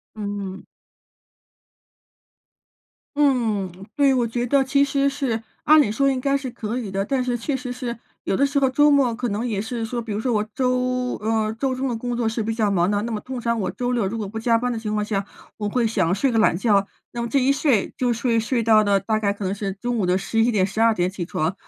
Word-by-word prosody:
嗯。 200 -2 -5 2.5
嗯， 235 -10 +2 0.2
对， 280 -2 +4
我 250 -2 +2
觉 240 +1 -2
得 270 +2 +3
其 280 +1 +2
实 280 0 +2
是 270 -5 -2 0.2
按 310 +1 +7
理 235 - +2
说 275 +5 +2
应 260 -1 -1
该 275 +2 +1
是 270 -2 -4
可 230 +1 -4
以 225 -6 -5
的， 195 +1 -1
但 260 +4 0
是 245 -1 -1
确 270 +4 -2
实 250 -1 -5
是 245 -1 -5 0.3
有 - - 0
的 280 - +3
时 280 0 +1
候 270 -1 +3
周 290 +3 +4
末 270 -5 +3
可 245 +1 -3
能 215 +3 -2
也 210 -4 -1
是 230 +1 -4
说， 235 +1 -3
比 225 - -9
如 205 - -2
说 245 +3 -1
我 210 -1 +1
周 250 0 0
呃， 220 0 0
周 255 +3 -2
中 265 +1 -1
的 245 - -1
工 245 +1 -3
作 235 -2 0
是 225 0 -2
比 225 +1 -2
较 220 -2 +1
忙 180 0 +2
的， 205 0 +1
那 230 +1 -3
么 215 - -2
通 255 +1 -6
常 235 -1 0
我 185 -2 -1
周 245 0 -2
六 235 -4 +1
如 225 +4 -4
果 210 -3 -4
不 215 - -10
加 230 0 +3
班 250 +1 -1
的 - - -3
情 215 -1 -3
况 210 0 0
下， 200 -2 -2 0.3
我 210 -1 -2
会 235 +2 +1
想 180 -6 +1
睡 250 +7 +1
个 225 - +2
懒 195 - +3
觉， 200 -2 +2 0.2
那 235 - -3
么 235 - -3
这 280 - +2
一 265 +1 +3
睡 275 -7 +1
就 250 -1 +1
睡 230 0 +1
睡 230 +2 0
到 215 -1 +5
了 200 -1 +3
大 215 +3 -1
概 200 -2 +1
可 200 0 -7
能 190 +1 -1
是 200 -1 -3
中 240 +4 -3
午 210 - 0
的 180 +1 +2
11 225 +4 +1
点 200 -5 +2
12 225 +4 +2
点 180 -4 0
起 185 -1 -5
床， 165 +1 -2
230 Hz, 265 characters per minute, -23 LUFS, 210-255 Hz, 2.5 s, 按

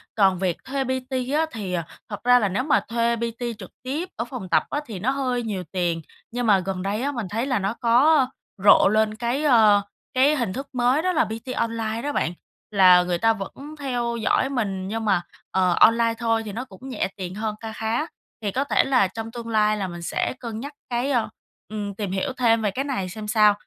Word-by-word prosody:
Còn 190 -4 +3
việc 185 -3 0
thuê 270 0 -2
PT 260 0 -3 0.3
á 320 - +3
thì, 200 -5 -5
à, 170 -2 -1 0.2
thật 205 - -6
ra 245 0 +6
là 205 -4 +1
nếu 200 +7 -1
mà 295 +1 +3
thuê 235 0 +1
PT 235 0 -4
trực 190 -5 -10
tiếp 300 +8 -3
ở 230 - -3
phòng 235 -7 -7
tập - - +4
á 295 - -1
thì 215 -7 -7
nó 235 +8 +1
hơi 255 -3 -1
nhiều 205 -5 -3
tiền, 175 -3 -1 0.3
nhưng 245 0 -2
mà 200 -3 +5
gần 185 0 -3
đây 200 +3 -2
á 280 +2 0
mình 235 -7 -4
thấy 225 +5 -1
là 255 -5 0
nó 195 +2 -1
có 260 +5 +4 0.4
rộ 200 - +7
lên 215 +1 +2
cái, 240 +5 -1
ơ, 220 -7 +6 0.3
cái 275 +4 +4
hình 235 -9 -1
thức 270 +5 -5
mới 250 +4 +2
đó 370 +2 +1
là 320 -1 +3
PT 225 +4 -6
online 225 -1 -1
đó 290 - -2
bạn, 175 - -1 0.4
là 185 -3 +7
người 180 -1 -1
ta 225 +5 +3
vẫn 270 +9 -8
theo 245 -4 -1
dõi 260 +4 +2
mình 200 -8 -2
nhưng 220 +2 -3
mà, 195 -4 +3 0.3
ờ, 185 -2 +3
online 230 0 +5
thôi 225 -1 +1
thì 210 - -5
nó 245 +5 -4
cũng 255 +4 -11
nhẹ 245 - -1
tiền 185 -1 -5
hơn 215 0 -2
kha 225 -1 -5
khá, 225 +6 -1 0.4
thì 205 -2 -1
có 265 +7 0
thể 285 - +2
là 255 -8 +3
trong 225 +3 -6
tương 235 -1 -7
lai 215 -1 +2
là 195 -2 -2
mình 175 -1 -7
sẽ 170 - -1
cân 230 -3 -5
nhắc 285 +5 -7 0.2
cái, 245 +3 0
ơ 240 -4 +1 0.4
ừm, 205 -1 -4
tìm 200 -2 -3
hiểu 255 +8 -1
thêm 230 -2 +3
về 210 -2 0
cái 265 +7 -2
này 225 -10 -2
xem 215 +3 -7
sao, 210 -1 +5
225 Hz, 235 wpm, -24 LUFS, 200-255 Hz, 0.4 s, rộ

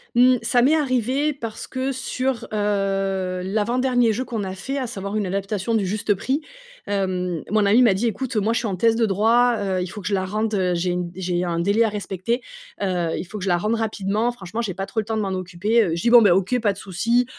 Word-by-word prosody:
Mmh, 250 +1 +6
ça 245 +1 +2
m'est 280 +6 +4
arrivé 270 +1 +1
parce 230 -5 -7
que 260 +1 -2
sur, 260 -1 -2
heu, 195 -3 -1
l'avant 215 +5 -1
dernier 245 -3 +3
jeu 250 - -2
qu'on 225 -5 -3
a 190 - -4
fait, 270 +9 -4
à 260 - -2
savoir, 200 -2 -5
une 210 -2 0
adaptation 195 +3 -2
du 210 -3 +1
Juste 205 +2 0
Prix, 265 +9 -1 0.5
hem, 180 -4 -1
mon 210 +1 +2
amie 215 +5 +5
m'a 230 -6 +5
dit: 220 +5 0
«Écoute, 240 +3 -3
moi, 215 +2 +2
je 230 - +1
suis 235 - -2
en 195 - -2
thèse 225 +5 +3
de 230 0 +2
droit, 230 +4 +3
heu, 190 -2 -1
il 180 - -2
faut 205 +4 -8
que 185 - -5
je 210 - -1
la 190 -1 +1
rende, 215 +3 -2
heu, 185 -2 +1
j'ai 180 +1 0
une 175 -1 -3
j'ai 180 -1 -1
un 170 -1 -1
délai 200 +6 +3
à 225 - +2
respecter, 210 +3 -3 0.4
heu 180 -4 0
il - - -4
faut 215 - -7
que 185 - -6
je 195 - -1
la 175 - +3
rende 215 +6 0
rapidement. 220 +1 -1
Franchement, 220 -1 -5
j'ai 205 -5 -3
pas 195 +1 -4
trop 195 +3 -3
le - - -10
temps 220 0 -2
de - - 0
m'en 200 - -2
occuper, 185 +5 +1
heu». 165 -5 -1
Je 170 - -3
dis: 235 - +2
«Bon, 240 0 +8
ben, 205 -5 +5
OK, 195 +7 +1
pas 205 -3 +2
de 195 - -15
souci. 230 +6 0
210 Hz, 260 wpm, -22 LUFS, 190-235 Hz, 0.5 s, Bon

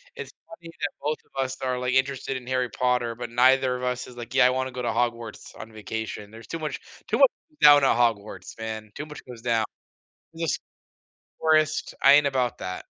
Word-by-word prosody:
It's 455 - -7 0.2
funny 170 -6 -12
that - - 0
both 150 +2 -1
of 135 0 -3
us 130 0 -5
are, 125 -1 -1
like, 125 0 -1
interested 130 0 0
in 125 - -11
Harry 130 -1 0
Potter, 120 0 0
but 120 0 -6
neither 130 +2 +4
of 125 - -6
us 125 0 -2
is 125 - -12
like, 120 +1 -8
"Yeah, 125 -2 +6
I - - +4
wanna 130 0 -1
go 125 0 -5
to 120 - -1
Hogwarts 115 -1 -2
on 110 - -9
vacation." 110 -1 -6
There's 115 0 -12
too 165 - -5
much 155 -1 -4 0.3
too - - 0
much - - +7 0.3
down 145 -1 +8
at 135 - +4
Hogwarts, 105 -5 -1
man. 110 -1 -6
Too 150 - -5
much 150 -1 -10
goes 125 -3 -10
down. 115 -2 +1 0.7
Just 165 -4 -1 0.8
forest, 155 -1 +2
I 140 - +8
ain't 145 0 +6
about 130 -3 0
that. 90 - -5
125 Hz, 210 wpm, -25 LUFS, 115-135 Hz, 0.8 s, down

